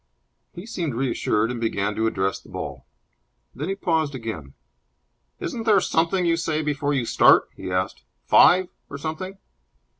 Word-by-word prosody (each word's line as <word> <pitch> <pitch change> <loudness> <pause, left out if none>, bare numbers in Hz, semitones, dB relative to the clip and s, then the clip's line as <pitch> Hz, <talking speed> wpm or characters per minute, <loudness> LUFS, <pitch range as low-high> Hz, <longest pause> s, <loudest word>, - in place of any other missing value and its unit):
He 180 +1 -9
seemed 170 - -3
reassured, 115 -3 0
and 120 -2 -5
began 105 -2 -1
to 110 0 +1
address 95 -3 -1
the - - -19
ball. - - -7 0.7
Then 150 +7 -4
he 195 - -1
paused 160 -7 0
again. 110 - -6 0.8
"Isn't 235 - -4
there 210 -3 +6
something 175 +1 +1
you 165 -1 +2
say 160 -2 -1
before 145 -1 -1
you 125 -3 0
start?" - - +5
he - - -7
asked. 90 0 -1 0.2
"'Five', 185 0 +6 0.2
or 140 - -6
something?" 160 +6 -5
145 Hz, 155 wpm, -24 LUFS, 115-175 Hz, 0.8 s, there